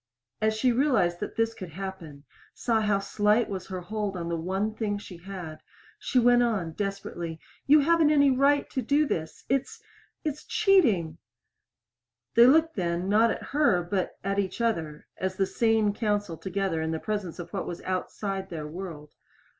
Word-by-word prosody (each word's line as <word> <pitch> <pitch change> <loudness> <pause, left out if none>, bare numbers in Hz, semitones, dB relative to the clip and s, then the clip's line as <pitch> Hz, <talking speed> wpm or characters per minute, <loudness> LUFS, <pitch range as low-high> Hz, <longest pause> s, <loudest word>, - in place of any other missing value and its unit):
As 220 0 +2
she 250 +3 +2
realized 230 -10 +2
that 210 - -5
this 225 0 +1
could 185 -5 -8
happen, 165 -5 -8 0.3
saw 225 -2 +1
how 210 -2 +2
slight 210 +3 +2
was 190 -2 -5
her 185 -1 -5
hold 205 +1 -3
on 170 -1 -4
the 170 - -1
one 190 +6 -2
thing 210 -2 -2
she 190 -3 -10
had, 175 -3 -8 0.4
she - - -1
went 245 0 +5
on, 210 -9 0
desperately, 175 -3 -4 0.3
"You 295 +2 +7
haven't 325 +1 +4
any 285 -2 +5
right 280 +2 +3
to 260 - -1
do 285 +6 +2
this! 160 - -4
It's 275 - -1 0.4
it's 300 -1 -3
cheating." 230 - +2 1.1
They 235 +1 +7
looked 320 +4 +4
then, 175 0 -1
not 220 +3 +5
at - - -3
her, 280 -12 +3
but 185 +1 -2
at 195 +1 0
each 190 +1 -2
other 165 -10 -1
as 190 0 -2
the 195 0 +1
sane 220 +1 +2
counsel 205 -5 -1
together 190 -2 -2
in 160 - -2
the 160 0 -2
presence 205 -5 -3
of 175 - -8
what - - -3
is 175 - -6
outside 190 +1 -3
their 160 -3 -5
world. 155 -2 -8
200 Hz, 175 wpm, -27 LUFS, 175-235 Hz, 1.1 s, You